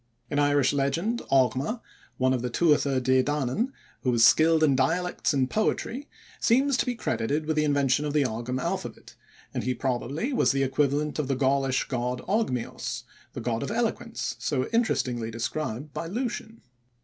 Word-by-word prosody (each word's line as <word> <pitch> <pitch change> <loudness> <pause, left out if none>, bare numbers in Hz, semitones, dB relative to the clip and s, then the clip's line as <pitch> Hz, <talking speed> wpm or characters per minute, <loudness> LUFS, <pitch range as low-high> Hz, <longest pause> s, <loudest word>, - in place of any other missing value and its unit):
In 145 - +1
Irish 145 -2 +3
legend 165 - 0
Ogma, 135 - +2 0.4
one 130 0 +2
of 125 - -1
the 125 - -2
Tuatha 145 -1 +2
De 130 +1 +3
Danann 145 - -1 0.3
who 130 - 0
was 115 -2 +5
skilled 160 +2 +5
in 140 -3 +4
dialects 165 +7 +1
and 135 -3 +1
poetry, 235 - -1 0.3
seems 265 +4 +3
to - - 0
be 245 - 0
credited 140 - -1
with 155 0 0
the 155 - +2
invention 145 -1 +2
of 150 -1 -2
the 150 -2 +3
Ogam 125 +2 -3
alphabet, - - -4 0.4
and - - -2
he 125 0 -1
probably 135 - -2
was 250 - +3
the 135 0 +1
equivalent 145 +3 0
of 150 - -1
the 135 - 0
Gaulish 135 0 +1
god 125 -1 -2
Ogmios, 190 - -2 0.3
the - - -5
god 115 -2 -1
of - - -3
eloquence, 230 +1 -2
so 130 -4 0
interestingly 125 - 0
described 125 +4 -4
by 165 - -4
Lucian. 225 +2 -4
140 Hz, 170 wpm, -27 LUFS, 130-170 Hz, 0.4 s, was